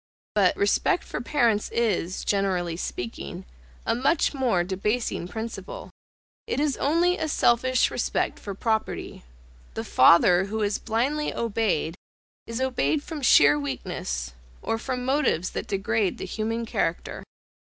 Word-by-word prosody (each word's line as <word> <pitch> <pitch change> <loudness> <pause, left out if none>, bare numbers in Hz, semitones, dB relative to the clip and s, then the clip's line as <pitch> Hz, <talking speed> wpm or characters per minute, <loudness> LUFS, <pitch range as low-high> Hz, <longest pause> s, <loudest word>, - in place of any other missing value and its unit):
But, - - +3
respect 390 -2 +2
for - - -5
parents 235 -5 +1
is, 200 -6 -1
generally 185 -4 0
speaking, 115 - -6 0.4
a - - +2
much 265 +9 +1
more 245 -10 +1
debasing 195 +1 -2
principle; 230 - -7 0.6
it - - -1
is 295 -2 +1
only 340 +5 +2
a 320 - -1
selfish 255 -2 +2
respect - - -1
for 200 -2 -6
property. 220 +1 -2 0.5
The - - -3
father 175 +6 +5
who 215 +2 -2
is 205 0 0
blindly 265 +7 -1
obeyed, 215 -8 -1 0.5
is 230 +1 -4
obeyed 265 +3 0
from 315 -4 -6
sheer 145 - +6
weakness, 65 - -4 0.3
or 225 - -1
from 250 0 -3
motives 265 - +1
that - - -4
degrade 205 0 0
the - - -5
human 225 +2 -2
character. 165 -6 -2
225 Hz, 135 wpm, -25 LUFS, 185-260 Hz, 0.6 s, sheer